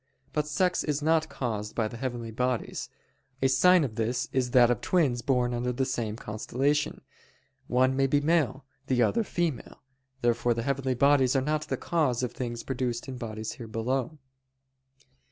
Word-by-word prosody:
But 150 Hz, -1 st, 0 dB
sex 180 Hz, +4 st, +1 dB
is 150 Hz, -1 st, -1 dB
not 160 Hz, 0 st, +2 dB
caused 110 Hz, -6 st, -4 dB
by 110 Hz, -2 st, +1 dB
the 110 Hz, -, -8 dB
heavenly 120 Hz, -2 st, -4 dB
bodies: 125 Hz, +1 st, -2 dB, 0.5 s
a 135 Hz, -, +3 dB
sign 175 Hz, +7 st, +5 dB
of 115 Hz, -6 st, -4 dB
this 120 Hz, +2 st, -1 dB
is 130 Hz, -2 st, +1 dB
that 120 Hz, -1 st, +5 dB
of 120 Hz, -, -1 dB
twins 140 Hz, -10 st, +1 dB
born 125 Hz, -1 st, +1 dB
under 120 Hz, +1 st, -1 dB
the 130 Hz, +2 st, -1 dB
same 115 Hz, -5 st, -2 dB
constellation, 130 Hz, +7 st, -1 dB, 0.7 s
one 130 Hz, +1 st, +3 dB
may 135 Hz, 0 st, +3 dB
be 145 Hz, +2 st, +3 dB
male, 145 Hz, -3 st, +1 dB, 0.2 s
the 125 Hz, -2 st, +3 dB
other 230 Hz, -, +2 dB
female. 175 Hz, -, -3 dB, 0.4 s
Therefore 120 Hz, 0 st, +2 dB
the 115 Hz, -, -2 dB
heavenly 135 Hz, -1 st, -1 dB
bodies 140 Hz, 0 st, +4 dB
are -, -, +5 dB
not 150 Hz, +3 st, -1 dB
the -, -, -2 dB
cause 145 Hz, -8 st, 0 dB
of 125 Hz, -, -1 dB
things 120 Hz, -2 st, -5 dB
produced 125 Hz, -2 st, -3 dB
in 130 Hz, -1 st, -6 dB
bodies 110 Hz, -2 st, -5 dB
here 120 Hz, -5 st, -9 dB
below. 125 Hz, +6 st, -2 dB
130 Hz, 170 wpm, -28 LUFS, 120-145 Hz, 0.7 s, sign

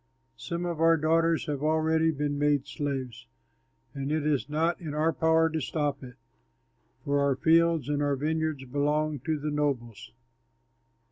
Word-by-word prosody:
Some 170 Hz, +9 st, -4 dB
of 170 Hz, -2 st, -3 dB
our 165 Hz, 0 st, +5 dB
daughters 165 Hz, +1 st, +2 dB
have 145 Hz, -2 st, -3 dB
already 160 Hz, +1 st, +2 dB
been 145 Hz, -2 st, -2 dB
made 145 Hz, -2 st, +2 dB
slaves, 135 Hz, -5 st, -5 dB, 0.7 s
and 140 Hz, +1 st, -4 dB
it 155 Hz, -1 st, 0 dB
is 145 Hz, -2 st, 0 dB
not 165 Hz, +4 st, 0 dB
in 155 Hz, -3 st, -5 dB
our 160 Hz, +2 st, +1 dB
power 160 Hz, 0 st, +3 dB
to 160 Hz, 0 st, -2 dB
stop 145 Hz, 0 st, -2 dB
it, 125 Hz, -1 st, -10 dB, 0.9 s
for 145 Hz, 0 st, +1 dB
our 140 Hz, -1 st, +2 dB
fields 165 Hz, 0 st, +3 dB
and 145 Hz, 0 st, -1 dB
our 145 Hz, -1 st, +1 dB
vineyards 155 Hz, -1 st, -2 dB
belong 150 Hz, +3 st, 0 dB
to 155 Hz, +4 st, -2 dB
the 150 Hz, +1 st, -3 dB
nobles." 135 Hz, -7 st, -3 dB
150 Hz, 155 wpm, -28 LUFS, 140-160 Hz, 0.9 s, our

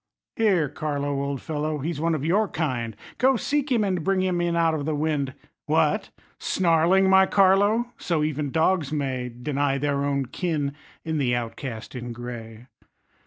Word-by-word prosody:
Here, 195 Hz, -9 st, +3 dB
Carlo, 145 Hz, -1 st, -2 dB
old 140 Hz, -1 st, -3 dB
fellow, 155 Hz, 0 st, -2 dB
he's 150 Hz, +2 st, -3 dB
one 165 Hz, 0 st, +1 dB
of 150 Hz, -1 st, -3 dB
your 205 Hz, +6 st, +2 dB
kind, 130 Hz, -, -2 dB, 0.2 s
Go, 265 Hz, +2 st, +4 dB
seek 290 Hz, +2 st, -1 dB
him, 230 Hz, -4 st, +3 dB
and 185 Hz, -5 st, -1 dB
bring 190 Hz, +1 st, +1 dB
him 180 Hz, -2 st, 0 dB
in 170 Hz, -1 st, 0 dB
out 165 Hz, -1 st, +3 dB
of 150 Hz, -3 st, -2 dB
the 155 Hz, 0 st, -1 dB
wind. 145 Hz, -3 st, -1 dB, 0.3 s
What! -, -, +2 dB, 0.3 s
snarling, 180 Hz, +2 st, +3 dB
my 190 Hz, 0 st, +6 dB
Carlo! 205 Hz, +5 st, +3 dB
So 165 Hz, -3 st, 0 dB
even 150 Hz, -1 st, -1 dB
dogs 160 Hz, 0 st, +1 dB
may 130 Hz, -4 st, -2 dB
Deny 135 Hz, +3 st, -1 dB
their 140 Hz, 0 st, 0 dB
own 140 Hz, -1 st, 0 dB
kin 150 Hz, 0 st, -2 dB, 0.3 s
in 160 Hz, -1 st, -1 dB
the 125 Hz, -3 st, +2 dB
outcast 115 Hz, -1 st, -5 dB
in 120 Hz, -2 st, -5 dB
gray. 120 Hz, -1 st, -8 dB
155 Hz, 165 wpm, -25 LUFS, 140-180 Hz, 0.3 s, my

